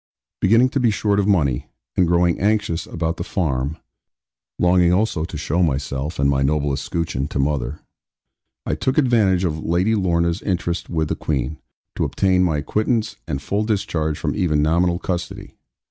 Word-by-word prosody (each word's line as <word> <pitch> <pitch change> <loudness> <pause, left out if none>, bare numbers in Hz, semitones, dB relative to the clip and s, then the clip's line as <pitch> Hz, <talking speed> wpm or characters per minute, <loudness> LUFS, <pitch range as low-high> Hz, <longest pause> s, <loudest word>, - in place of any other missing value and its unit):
Beginning 115 +6 +4
to 135 - -1
be 120 -2 +3
short 105 -1 +1
of 100 - +1
money, 70 -11 +1 0.3
and 90 - +3
growing 85 0 +2
anxious 105 -4 0
about 80 0 -2
the - - -3
farm, 75 -6 -1 0.8
longing 90 0 +4
also 90 -4 +1
to - - -7
show 85 +5 -1
myself 70 -1 -1
and 70 - +2
my 70 -1 +2
noble 70 0 +1
escutcheon 70 -2 -2
to 75 - -5
mother, 70 -1 -1 0.8
I - - -1
took 130 - -1
advantage 110 -10 +3
of 80 -3 -1
Lady 90 +6 +1
Lorna's 85 -2 +1
interest 85 -2 -2
with 80 -2 -1
the - - 0
Queen, 75 0 -2 0.4
to - - -1
obtain 95 -1 +2
my 80 -4 +1
acquittance 110 - -1
and 70 -4 -2
full 100 +8 0
discharge 90 -8 -1
from - - -2
even 75 -4 +1
nominal 85 +3 +2
custody. 90 -1 -5
85 Hz, 165 wpm, -21 LUFS, 75-95 Hz, 0.8 s, Beginning